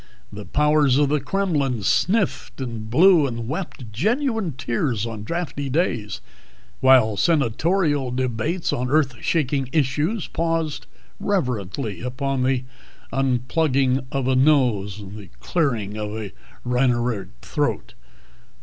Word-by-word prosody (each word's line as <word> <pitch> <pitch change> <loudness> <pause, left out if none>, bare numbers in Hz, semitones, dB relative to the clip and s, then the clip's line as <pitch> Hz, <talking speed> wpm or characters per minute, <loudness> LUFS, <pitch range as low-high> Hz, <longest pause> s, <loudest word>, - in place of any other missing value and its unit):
The 105 0 -8
powers 150 -3 +3
in 145 -1 +3
the 150 +1 +2
Kremlin 145 - -1
sniffed 185 - 0
and 115 -4 -5
blew 160 +3 +5
and 115 -2 -5
wept 140 - -5
genuine 220 - 0
tears 120 -3 -1
on 110 -2 -6
drafty 145 0 -3
days, 120 - -1 0.6
while 125 -5 +5
senatorial 150 - +1
debates 130 +7 -1
on 125 +1 -1
earth 145 -2 +2
shaking 140 -5 0
issues 155 - 0
paused 165 -2 -2 0.3
reverently 120 - -2
upon 130 +2 -2
the 130 0 +1 0.5
unplugging 135 +1 +1
of 135 -2 -1
a 130 - +2
nose, 120 -8 +2
the 100 0 -10
clearing 120 - -1
of 105 0 -4
a 105 -3 -5 0.3
rhinorrheic 120 -5 +1 0.2
throat. 145 -1 -2
135 Hz, 115 wpm, -23 LUFS, 120-155 Hz, 0.6 s, blew